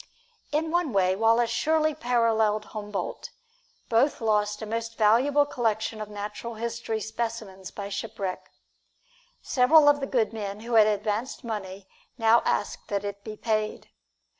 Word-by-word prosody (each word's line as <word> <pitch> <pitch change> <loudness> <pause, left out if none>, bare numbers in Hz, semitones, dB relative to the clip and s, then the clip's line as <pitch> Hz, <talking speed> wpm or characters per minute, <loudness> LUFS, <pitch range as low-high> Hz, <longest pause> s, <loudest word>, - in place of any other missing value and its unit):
In 315 +2 0
one 345 -7 0
way, 185 -1 +3
Wallace 230 +2 +3
surely 310 +5 +2
paralleled 225 -6 +1
Humboldt: 210 -2 -5 0.6
both 250 +6 +2
lost 210 -2 +1
a - - -3
most 230 +1 -4
valuable 255 +7 +4
collection 220 -4 -1
of 210 - -6
natural 210 +3 -6
history 230 0 -3
specimens 220 -3 -5
by 200 -1 -6
shipwreck. 195 -2 -5 0.9
Several 290 +4 +5
of 290 0 +5
the 275 - -3
good 235 -4 +1
men 205 -1 -5
who 235 +1 -6
had 220 -2 +7
advanced 215 +5 -2
money 195 -4 -6 0.3
now 225 0 +5
asked 205 - -1
that 200 0 -2
it 200 0 -6
be 215 0 -7
paid. 215 -1 -2
225 Hz, 140 wpm, -26 LUFS, 210-240 Hz, 0.9 s, had